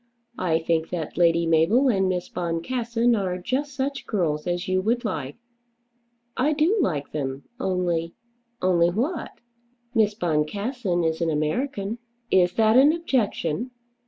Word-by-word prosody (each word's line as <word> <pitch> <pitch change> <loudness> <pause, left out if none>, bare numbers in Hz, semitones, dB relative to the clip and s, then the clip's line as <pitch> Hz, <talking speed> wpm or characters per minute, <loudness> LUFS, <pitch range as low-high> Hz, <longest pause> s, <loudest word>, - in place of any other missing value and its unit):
I 170 -3 +2
think 165 0 0
that 165 -4 -4
Lady 170 0 +3
Mabel 165 - +3
and 190 -6 +2
Miss 180 -1 -2
Boncassen 230 +8 0
are 185 -4 -1
just 260 +9 -2
such 275 +1 -3
girls 160 -7 -1
as 175 0 -2
you 185 0 +1
would 235 +4 0
like." 145 -9 -3 1.0
"I 290 +4 +2
do 315 +8 +2
like 150 - -1
them; 135 -2 -4 0.2
only 175 -3 -1 0.2
" 240 0 -46
"Only 175 -2 +4
what?" 260 - -2 0.6
"Miss 215 -3 +2
Boncassen 180 - -1
is 160 +1 -1
an 165 - +1
American." 200 - -2 0.3
"Is 180 -1 +4
that 220 +1 +4
an 280 +3 +7
objection? 250 - -1
185 Hz, 140 wpm, -24 LUFS, 165-240 Hz, 1.0 s, an